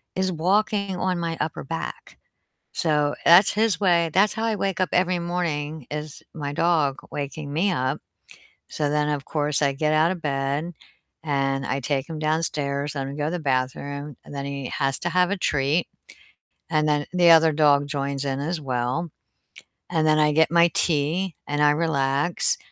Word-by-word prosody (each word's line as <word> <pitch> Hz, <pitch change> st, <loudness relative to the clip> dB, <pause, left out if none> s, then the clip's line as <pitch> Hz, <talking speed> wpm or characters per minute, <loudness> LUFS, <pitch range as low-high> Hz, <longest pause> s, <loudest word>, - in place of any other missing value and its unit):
is 190 Hz, 0 st, 0 dB
walking 200 Hz, +3 st, 0 dB
on 185 Hz, -1 st, -1 dB
my 165 Hz, -1 st, -3 dB
upper 155 Hz, 0 st, -3 dB
back. 80 Hz, -, -6 dB, 0.6 s
So 150 Hz, -3 st, +1 dB
that's 175 Hz, +4 st, +7 dB
his 215 Hz, -4 st, +1 dB
way 170 Hz, -3 st, +3 dB
That's 200 Hz, +2 st, +3 dB
how 225 Hz, 0 st, -2 dB
I 220 Hz, -2 st, 0 dB
wake 195 Hz, -2 st, -2 dB
up 185 Hz, -4 st, +1 dB
every 180 Hz, 0 st, +2 dB
morning 160 Hz, -5 st, -3 dB
is 150 Hz, 0 st, -6 dB
my 145 Hz, -2 st, -5 dB
dog 155 Hz, -4 st, +1 dB
waking 145 Hz, +1 st, -5 dB
me 185 Hz, +5 st, +1 dB
up. 130 Hz, -5 st, -1 dB, 0.7 s
So 150 Hz, -2 st, -1 dB
then 150 Hz, 0 st, +1 dB
of 145 Hz, -2 st, -2 dB
course 150 Hz, -1 st, +1 dB
I 140 Hz, -1 st, +3 dB
get 155 Hz, +2 st, 0 dB
out 160 Hz, +3 st, +3 dB
of 175 Hz, -3 st, -5 dB
bed 140 Hz, +4 st, -2 dB, 0.5 s
and 135 Hz, -2 st, -1 dB
I 135 Hz, -, -1 dB
take 140 Hz, +2 st, -2 dB
him 160 Hz, -, -5 dB
downstairs, 150 Hz, -2 st, -1 dB
let 135 Hz, -1 st, -3 dB
him 140 Hz, -, -6 dB
go 150 Hz, -, -1 dB
to 155 Hz, -, -1 dB
the 180 Hz, -, -2 dB
bathroom, 140 Hz, +1 st, -2 dB
and -, -, -10 dB
then 140 Hz, 0 st, -4 dB
he 140 Hz, -2 st, -5 dB
has 135 Hz, 0 st, -1 dB
to 175 Hz, -, -2 dB
have 180 Hz, +1 st, +2 dB
a 200 Hz, -, 0 dB
treat, 150 Hz, +1 st, 0 dB, 0.8 s
and 155 Hz, -1 st, +2 dB
then 145 Hz, -1 st, +1 dB
the 175 Hz, -2 st, +5 dB
other 160 Hz, -1 st, +7 dB
dog 145 Hz, -2 st, +3 dB
joins 140 Hz, -1 st, -3 dB
in 135 Hz, 0 st, -2 dB
as 160 Hz, +3 st, -2 dB
well. 130 Hz, +4 st, -2 dB, 0.8 s
And 160 Hz, -3 st, +1 dB
then 155 Hz, 0 st, +4 dB
I 150 Hz, 0 st, +4 dB
get 160 Hz, +1 st, +3 dB
my 170 Hz, 0 st, +5 dB
tea 165 Hz, +3 st, 0 dB
and 145 Hz, 0 st, -1 dB
I 145 Hz, -, +6 dB
relax. 150 Hz, 0 st, +1 dB
150 Hz, 180 wpm, -24 LUFS, 140-170 Hz, 0.8 s, that's